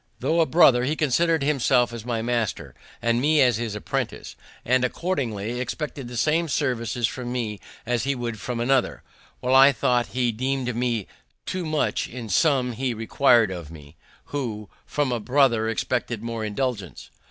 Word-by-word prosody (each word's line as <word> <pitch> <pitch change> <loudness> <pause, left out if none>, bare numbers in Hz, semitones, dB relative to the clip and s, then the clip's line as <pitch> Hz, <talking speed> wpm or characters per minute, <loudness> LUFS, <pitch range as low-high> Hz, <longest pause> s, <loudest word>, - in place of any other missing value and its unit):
Though 165 +1 +2
a 160 - +2
brother, 130 -7 +5
he 145 +5 0
considered 160 +2 +2
himself 130 -4 +2
as 115 -2 -6
my 115 -2 -1
master, 115 -7 -2 0.3
and 120 0 +2
me 150 +2 +3
as 125 -5 +4
his 115 -2 -3
apprentice, 105 - -4 0.3
and, 130 +1 +2
accordingly, 125 - -2
expected 125 +2 -4
the 120 0 -7
same 160 +6 +2
services 120 -5 -1
from 125 -1 -6
me 110 -5 -3 0.3
as 120 -2 0
he 140 +1 0
would 120 -3 -4
from 120 +2 -4
another, 130 +2 +1 0.4
while 125 +1 0
I 135 +1 +8
thought 120 -1 +1
he 125 -2 +2
demean'd 130 +2 -2
me 120 -4 -1 0.4
too 185 -3 -3
much 155 -1 0
in 120 -2 -8
some 130 - +2
he 125 +1 -2
requir'd 115 -1 +3
of 85 -5 -7
me, 75 -2 -13 0.4
who 110 -8 -4 0.2
from 145 -3 -1
a 120 - -1
brother 120 -2 +2
expected 115 0 -2
more 115 -1 -4
indulgence. 105 - -4
125 Hz, 165 wpm, -24 LUFS, 115-135 Hz, 0.4 s, I